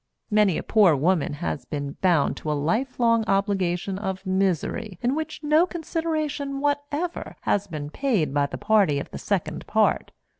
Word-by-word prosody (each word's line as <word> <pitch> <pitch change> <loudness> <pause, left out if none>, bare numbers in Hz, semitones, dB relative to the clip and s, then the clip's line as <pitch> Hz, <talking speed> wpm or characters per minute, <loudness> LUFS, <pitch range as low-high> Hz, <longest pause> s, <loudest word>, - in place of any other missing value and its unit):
Many 210 -4 +3
a - - -3
poor 200 -8 +5
woman 160 +2 +1
has 80 - -3
been 145 -1 -4
bound 175 -6 +3
to 155 - -3
a 150 - 0
life 220 - -1
long 230 -1 +3
obligation 195 -2 0
of 190 -1 -4
misery 190 +2 -1
in 245 +2 +2
which 315 0 -4
no 305 +4 +4
consideration 310 -5 -3
whatever 290 +4 -2
has 205 0 0
been 150 -4 -6
paid 210 - 0
by 145 -1 +2
the - - -6
party 205 -9 +3
of 140 - -5
the - - -6
second 165 -6 -2
part. 215 0 +2
200 Hz, 165 wpm, -25 LUFS, 165-275 Hz, -, poor